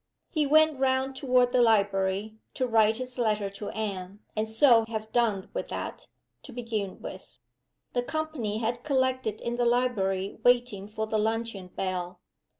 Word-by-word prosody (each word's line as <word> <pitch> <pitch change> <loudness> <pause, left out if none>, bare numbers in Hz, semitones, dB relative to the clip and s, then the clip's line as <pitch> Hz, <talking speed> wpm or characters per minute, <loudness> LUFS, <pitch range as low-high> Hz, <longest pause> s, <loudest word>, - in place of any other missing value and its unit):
He 305 -3 +1
went 310 -1 +4
round 265 0 +1
toward 250 -2 +3
the 250 -1 +4
library, 200 -1 +2 0.2
to 255 - 0
write 220 -2 +3
his 255 0 -5
letter 210 -4 +1
to 200 +1 -6
Anne 200 -2 -5
and 215 +1 0
so 225 +1 +5
have 220 -1 -5
done 220 -6 +1
with - - -3
that, - - -6 0.3
to 275 - -12
begin 225 -5 -4
with. - - -9 0.6
The 245 - +1
company 280 -7 -3
had 235 +2 -2
collected 260 -6 0
in 240 0 -3
the 245 - +2
library 205 -6 0
waiting 245 -5 +2
for 220 0 -3
the 220 0 0
luncheon 220 -3 -2
bell. 180 -1 -4
225 Hz, 155 wpm, -28 LUFS, 205-250 Hz, 0.6 s, so